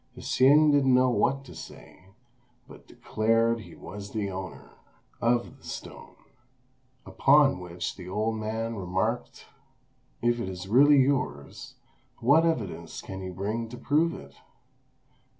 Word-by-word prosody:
Hsing 145 Hz, +4 st, +4 dB
didn't 135 Hz, -3 st, +4 dB
know 130 Hz, 0 st, +4 dB
what 135 Hz, +3 st, 0 dB
to -, -, -12 dB
say, 95 Hz, -, -13 dB, 0.6 s
but -, -, -15 dB
declared 115 Hz, +1 st, 0 dB
he 110 Hz, -, -12 dB
was 100 Hz, 0 st, -9 dB
the 105 Hz, -3 st, -2 dB
owner 95 Hz, 0 st, -8 dB, 0.5 s
of 120 Hz, 0 st, 0 dB
the -, -, -25 dB
stone; -, -, -9 dB, 0.9 s
upon 140 Hz, -6 st, +4 dB
which 90 Hz, -1 st, -5 dB
the 90 Hz, -, -10 dB
old 110 Hz, +3 st, -1 dB
man 110 Hz, +1 st, -3 dB
remarked, 95 Hz, 0 st, -3 dB, 0.7 s
"If 120 Hz, 0 st, +1 dB
it 95 Hz, -, -3 dB
is 90 Hz, 0 st, -7 dB
really 140 Hz, +7 st, +6 dB
yours, 130 Hz, -, -1 dB, 0.4 s
what 150 Hz, +7 st, +4 dB
evidence 100 Hz, -, -3 dB
can 95 Hz, 0 st, -8 dB
you 95 Hz, 0 st, -6 dB
bring 110 Hz, +5 st, -3 dB
to 125 Hz, -, -9 dB
prove 160 Hz, +6 st, +1 dB
it?" 70 Hz, 0 st, -12 dB
115 Hz, 135 wpm, -27 LUFS, 95-135 Hz, 0.9 s, really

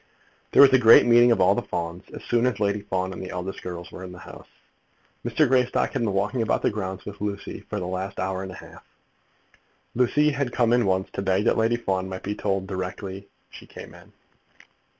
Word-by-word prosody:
There -, -, +8 dB
was 135 Hz, -, +6 dB
a 130 Hz, -, +6 dB
great 115 Hz, -2 st, +7 dB
meeting 120 Hz, 0 st, +6 dB
of 115 Hz, -, +2 dB
all 90 Hz, -, +5 dB
the -, -, -1 dB
Fawns, 85 Hz, +2 st, -5 dB
as -, -, -9 dB
soon 120 Hz, +1 st, +1 dB
as 115 Hz, -5 st, -2 dB
Lady 100 Hz, 0 st, 0 dB
Fawn 95 Hz, -1 st, -3 dB
and -, -, -8 dB
the 95 Hz, -, -7 dB
eldest 90 Hz, +2 st, -6 dB
girls 85 Hz, -1 st, -7 dB
were 95 Hz, -, -9 dB
in 90 Hz, -, -8 dB
the 90 Hz, -, -11 dB
house. -, -, -12 dB, 0.8 s
Mr. 120 Hz, +5 st, +2 dB
Greystock 125 Hz, 0 st, +1 dB
had -, -, -2 dB
been 110 Hz, -3 st, 0 dB
walking 105 Hz, +6 st, -1 dB
about 110 Hz, -, 0 dB
the -, -, +2 dB
grounds 95 Hz, -3 st, -5 dB
with 105 Hz, 0 st, -9 dB
Lucy 100 Hz, -1 st, -5 dB
for 105 Hz, -, -3 dB
the 90 Hz, -, -4 dB
last 95 Hz, +2 st, -5 dB
hour 95 Hz, 0 st, -2 dB
and 95 Hz, -1 st, -6 dB
a -, -, -9 dB
half. -, -, -13 dB, 1.1 s
Lucy 145 Hz, +5 st, +2 dB
had 140 Hz, -3 st, -2 dB
come 120 Hz, -1 st, +2 dB
in 120 Hz, -4 st, +2 dB
once 95 Hz, 0 st, 0 dB
to -, -, -4 dB
beg 95 Hz, +1 st, +1 dB
that -, -, +3 dB
Lady 115 Hz, +1 st, +2 dB
Fawn 95 Hz, -5 st, -2 dB
might 95 Hz, 0 st, -7 dB
be 100 Hz, -, -3 dB
told 95 Hz, -2 st, -2 dB
directly 95 Hz, +1 st, -6 dB, 0.2 s
she -, -, -13 dB
came -, -, -11 dB
in. -, -, -17 dB
100 Hz, 225 wpm, -24 LUFS, 95-120 Hz, 1.1 s, There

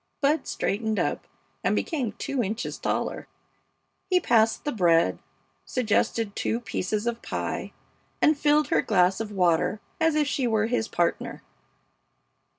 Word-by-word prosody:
Bud 300 Hz, +3 st, +1 dB
straightened 220 Hz, +1 st, -1 dB
up -, -, -1 dB, 0.4 s
and -, -, +2 dB
became 260 Hz, -, -1 dB
two 275 Hz, +4 st, -2 dB
inches 225 Hz, +3 st, -3 dB
taller. -, -, -2 dB, 0.8 s
He 365 Hz, -1 st, +4 dB
passed 225 Hz, -7 st, +2 dB
the 295 Hz, -, 0 dB
bread, 170 Hz, -7 st, +3 dB, 0.4 s
suggested 220 Hz, -2 st, 0 dB
two 230 Hz, -, -1 dB
pieces 215 Hz, -2 st, -2 dB
of 235 Hz, 0 st, -2 dB
pie, -, -, -4 dB, 0.5 s
and 305 Hz, -, +4 dB
filled 295 Hz, +1 st, +2 dB
her -, -, +3 dB
glass 185 Hz, -2 st, +2 dB
of 220 Hz, -2 st, -4 dB
water 180 Hz, +1 st, +2 dB, 0.2 s
as 320 Hz, -2 st, +3 dB
if 305 Hz, -1 st, +3 dB
she 270 Hz, -3 st, 0 dB
were 220 Hz, -2 st, +2 dB
his 230 Hz, -1 st, 0 dB
partner. 175 Hz, -, -1 dB
225 Hz, 140 wpm, -26 LUFS, 205-280 Hz, 0.8 s, He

